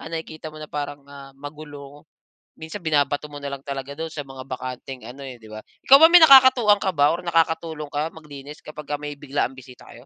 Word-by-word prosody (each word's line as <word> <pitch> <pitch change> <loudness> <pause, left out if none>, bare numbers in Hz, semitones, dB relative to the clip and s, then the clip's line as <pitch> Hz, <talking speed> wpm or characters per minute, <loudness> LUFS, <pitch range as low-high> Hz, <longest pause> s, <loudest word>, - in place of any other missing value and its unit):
ah, - - -9
nakikita 160 -1 -7
mong 155 0 -9
na - - -42
parang, 145 -1 -5
ah, 140 -1 -12
magulo, 145 0 -11 0.5
minsan 160 +4 -8
binabato 145 -1 0
mo 145 - -8
na 140 - -5
lang 135 -1 -7
talaga 140 0 -6
do'n 160 0 -5
sa 145 - -4
mga 135 -1 -11
bakanteng 130 0 -7
ano 135 +3 -10
eh, 130 -2 -9
di 110 - -14
ba? 110 - -8 0.3
Ikaw 275 - +9
ba 320 - +9
may 350 -2 +8
nakakatuwang 260 -7 +7
ka 190 - +1
ba 145 +1 +3
or - - -4
nakakatulong 160 -2 -1
ka 150 +2 -3
maglinis 150 -1 -12
kapagka 150 -1 -7
may 145 -1 -7
biglaang 135 -2 -3
bisita 125 -1 -14
kayo? - - -14
145 Hz, 215 wpm, -22 LUFS, 140-160 Hz, 0.5 s, Ikaw